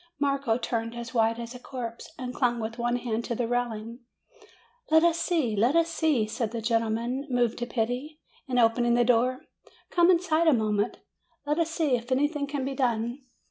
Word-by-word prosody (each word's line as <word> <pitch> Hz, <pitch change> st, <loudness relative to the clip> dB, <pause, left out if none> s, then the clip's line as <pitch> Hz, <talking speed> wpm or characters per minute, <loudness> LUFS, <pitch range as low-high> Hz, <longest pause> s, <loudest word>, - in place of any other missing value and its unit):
Marco 275 Hz, -5 st, +1 dB
turned 230 Hz, -1 st, -3 dB
as 235 Hz, -1 st, -7 dB
white 225 Hz, -1 st, +2 dB
as 235 Hz, +1 st, -6 dB
a 250 Hz, -, -9 dB
corpse, 240 Hz, -3 st, -7 dB
and 250 Hz, -1 st, -5 dB
clung 240 Hz, -2 st, +1 dB
with 225 Hz, +1 st, -5 dB
one 240 Hz, +1 st, +1 dB
hand 235 Hz, -2 st, -2 dB
to 235 Hz, -, -3 dB
the 235 Hz, 0 st, -1 dB
railings. 235 Hz, -1 st, -2 dB, 0.9 s
"Let 320 Hz, +1 st, +5 dB
us 340 Hz, -1 st, +3 dB
see, 315 Hz, -12 st, 0 dB
let 235 Hz, +9 st, +2 dB
us 335 Hz, 0 st, +3 dB
see," 315 Hz, -8 st, +1 dB
said 220 Hz, +1 st, -2 dB
the 230 Hz, +1 st, -4 dB
gentleman, 230 Hz, +4 st, -1 dB
moved 245 Hz, -2 st, +1 dB
to 240 Hz, -, -3 dB
pity, 245 Hz, +6 st, -3 dB, 0.3 s
and 255 Hz, -1 st, -1 dB
opening 235 Hz, 0 st, +3 dB
the 240 Hz, 0 st, +3 dB
door; 250 Hz, +2 st, +2 dB, 0.5 s
"come 345 Hz, 0 st, +4 dB
inside 335 Hz, -2 st, +3 dB
a 315 Hz, -, +7 dB
mo 220 Hz, -3 st, +1 dB
ment; 205 Hz, +2 st, 0 dB, 0.5 s
let 295 Hz, +3 st, 0 dB
us 330 Hz, -1 st, +1 dB
see 320 Hz, -5 st, +1 dB
if 240 Hz, +1 st, -6 dB
anything 290 Hz, +2 st, +1 dB
can 280 Hz, -2 st, -3 dB
be 275 Hz, -, -2 dB
done." 240 Hz, -1 st, -1 dB
245 Hz, 195 wpm, -27 LUFS, 230-280 Hz, 0.9 s, a